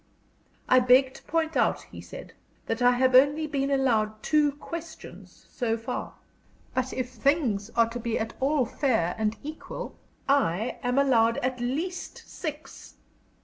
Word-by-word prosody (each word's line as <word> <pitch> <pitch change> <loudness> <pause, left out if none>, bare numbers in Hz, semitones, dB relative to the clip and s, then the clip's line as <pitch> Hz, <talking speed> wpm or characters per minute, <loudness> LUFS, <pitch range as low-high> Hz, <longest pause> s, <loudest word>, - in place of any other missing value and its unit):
"I 255 - +6
beg 255 +1 +4
to - - -13
point 325 -1 -1
out," - - +1
he - - -11
said, - - -10 0.3
"that 225 +2 -3
I 245 0 +5
have 255 +1 +2
only 285 +4 +5
been 280 -2 -1
allowed 225 -6 +1
two 300 -2 +3
questions 325 +2 -10
so 230 -3 -1
far. 230 +2 -5 0.6
But 260 0 -1
if 255 -1 -3
things 255 -8 0
are 230 -1 +4
to 240 +1 -5
be 230 -1 -2
at 225 +1 -3
all 275 0 +2
fair 225 - 0
and 215 0 0
equal, 310 +2 -7 0.3
I 240 -6 +1
am 245 +1 -1
owed 230 -5 +4
at 255 0 -1
least 305 +10 -4
six." 310 -2 -8
255 Hz, 150 wpm, -27 LUFS, 230-285 Hz, 0.6 s, I